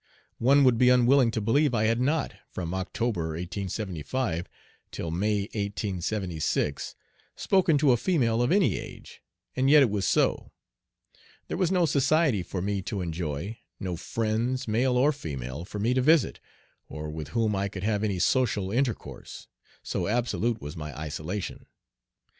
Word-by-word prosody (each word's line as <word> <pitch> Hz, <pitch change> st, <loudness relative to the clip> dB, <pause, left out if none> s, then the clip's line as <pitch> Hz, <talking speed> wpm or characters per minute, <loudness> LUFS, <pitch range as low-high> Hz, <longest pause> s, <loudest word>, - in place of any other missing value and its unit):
One 140 Hz, +4 st, +5 dB
would 125 Hz, -3 st, +4 dB
be 125 Hz, -, +6 dB
unwilling 125 Hz, 0 st, +5 dB
to 110 Hz, -1 st, -2 dB
believe 125 Hz, +5 st, +2 dB
I 105 Hz, -, +2 dB
had 115 Hz, +2 st, +2 dB
not, 150 Hz, +4 st, 0 dB, 0.2 s
from 85 Hz, -1 st, -5 dB
October, 95 Hz, -3 st, -2 dB
1875, 95 Hz, -, -3 dB, 0.4 s
till 80 Hz, -, -5 dB
May, 100 Hz, +4 st, 0 dB
1876, 95 Hz, -7 st, -2 dB, 0.4 s
spoken 185 Hz, -5 st, +3 dB
to 140 Hz, -2 st, +4 dB
a 120 Hz, -, +4 dB
female 120 Hz, -7 st, +1 dB
of 120 Hz, -, +1 dB
any 195 Hz, 0 st, +3 dB
age, -, -, -11 dB, 0.3 s
and 130 Hz, +1 st, +2 dB
yet 150 Hz, -1 st, +8 dB
it 120 Hz, -, +1 dB
was 100 Hz, -2 st, 0 dB
so. -, -, +1 dB, 1.0 s
There -, -, -2 dB
was 185 Hz, -1 st, +1 dB
no 180 Hz, -2 st, +3 dB
society 145 Hz, -, +2 dB
for 90 Hz, +1 st, -4 dB
me 100 Hz, 0 st, -1 dB
to 100 Hz, +1 st, -4 dB
enjoy 85 Hz, +4 st, -4 dB, 0.2 s
no 90 Hz, -2 st, -3 dB
friends, 115 Hz, +7 st, -2 dB
male 125 Hz, +3 st, +2 dB
or 140 Hz, +4 st, +4 dB
female, 70 Hz, -, -6 dB
for 105 Hz, -, -7 dB
me 110 Hz, +5 st, +1 dB
to 130 Hz, -, +2 dB
visit, 155 Hz, +1 st, +3 dB, 0.5 s
or 75 Hz, 0 st, -6 dB
with 75 Hz, -1 st, -6 dB
whom 110 Hz, +6 st, 0 dB
I 100 Hz, +1 st, 0 dB
could 95 Hz, -2 st, -7 dB
have 105 Hz, 0 st, 0 dB
any 100 Hz, -3 st, 0 dB
social 100 Hz, -1 st, +1 dB
intercourse, 125 Hz, 0 st, -3 dB, 0.4 s
so -, -, -2 dB
absolute 120 Hz, 0 st, 0 dB
was 75 Hz, -5 st, -7 dB
my 75 Hz, -3 st, -7 dB
isolation. 80 Hz, +6 st, -5 dB
110 Hz, 155 wpm, -27 LUFS, 90-130 Hz, 1.0 s, yet